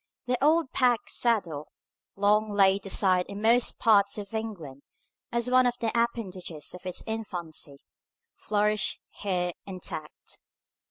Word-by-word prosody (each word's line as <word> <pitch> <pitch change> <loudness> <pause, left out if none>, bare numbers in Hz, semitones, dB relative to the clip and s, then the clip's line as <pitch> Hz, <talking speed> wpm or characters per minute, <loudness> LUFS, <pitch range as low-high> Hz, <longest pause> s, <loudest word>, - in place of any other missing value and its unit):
The 250 +1 -1
old 315 -1 +3
pack 245 -3 +2
saddle, 180 -11 0 0.5
long 210 +2 +3
laid 195 -1 +3
aside 185 -2 +2
in 200 0 -7
most 230 +3 +3
parts 200 -3 +4
of 205 0 -7
England 185 -12 -5 0.5
as 235 0 0
one 255 0 +5
of 245 - 0
the 230 -1 0
appendages 190 -9 -2
of 180 0 -9
its 180 - -3
infancy, 175 -10 -5 0.6
flourished 210 0 0
here 180 -3 -1 0.2
intact. 180 -5 -8
205 Hz, 125 wpm, -28 LUFS, 180-230 Hz, 0.6 s, one